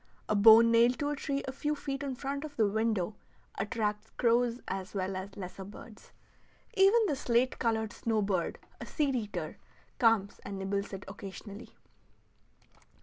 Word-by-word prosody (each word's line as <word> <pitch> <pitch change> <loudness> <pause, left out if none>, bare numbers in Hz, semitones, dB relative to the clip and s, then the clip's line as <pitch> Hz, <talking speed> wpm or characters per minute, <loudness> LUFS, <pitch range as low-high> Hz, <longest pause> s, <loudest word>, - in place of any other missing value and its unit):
A 215 - +1
bone 225 +2 +8
nailed 235 +2 +5
to 290 - -1
a - - -1
tree 280 0 -2
a - - -2
few 295 +3 -2
feet 275 -1 -4
in 275 -2 -3
front 280 +3 -4
of 300 -2 -8
the 220 -3 +3
window 215 -2 0 0.5
attracts 210 0 -2
crows 240 0 +2
as 190 +1 -5
well 190 0 -2
as 190 +1 -6
lesser 190 0 -7
birds. 210 +3 -13 0.6
Even 410 +4 +5
the 300 - 0
slate 255 -1 +1
colored 220 -2 0
snow 220 -2 0
bird, 190 -4 -1 0.2
a - - -6
seed 285 -4 0
eater, 215 -4 -4 0.4
comes 225 -5 +3
and 200 0 -7
nibbles 200 +1 -2
it 195 0 -6
occasionally. 200 +2 -9
225 Hz, 160 wpm, -31 LUFS, 200-260 Hz, 0.6 s, bone